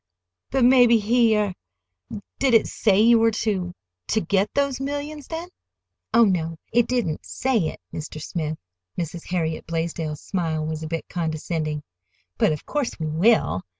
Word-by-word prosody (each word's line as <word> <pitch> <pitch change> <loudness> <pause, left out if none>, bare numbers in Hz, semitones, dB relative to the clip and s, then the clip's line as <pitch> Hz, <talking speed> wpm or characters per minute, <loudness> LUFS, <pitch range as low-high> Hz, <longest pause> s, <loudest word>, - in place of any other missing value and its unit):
"But 265 -2 +3
maybe 245 -2 +6
he—er—Did 205 - -1
it 225 - +5
say 200 -3 +2
you 230 +1 +6
were 225 0 +4
to—to 180 - -3
get 200 +2 +1
those 280 -2 0
millions 290 +1 -4
then?" 330 +2 -5 0.6
"Oh, 230 +1 +6
no, 165 -4 0 0.2
it 240 0 +4
didn't 235 -12 -1
say 240 -10 0
it, - - -6
Mr. 155 0 -6
Smith." 155 -1 -3 0.4
Mrs. 170 0 -5
Harriet 160 -3 -2
Blaisdell's 165 -2 -3
smile 165 -5 -2
was 155 0 -4
a 160 - -4
bit 165 +1 -4
condescending. 155 -2 -3 0.6
"But - - +4
of 150 - -4
course 290 -10 -2
we 160 - -2
will. 165 - +3
180 Hz, 145 wpm, -24 LUFS, 160-235 Hz, 0.6 s, maybe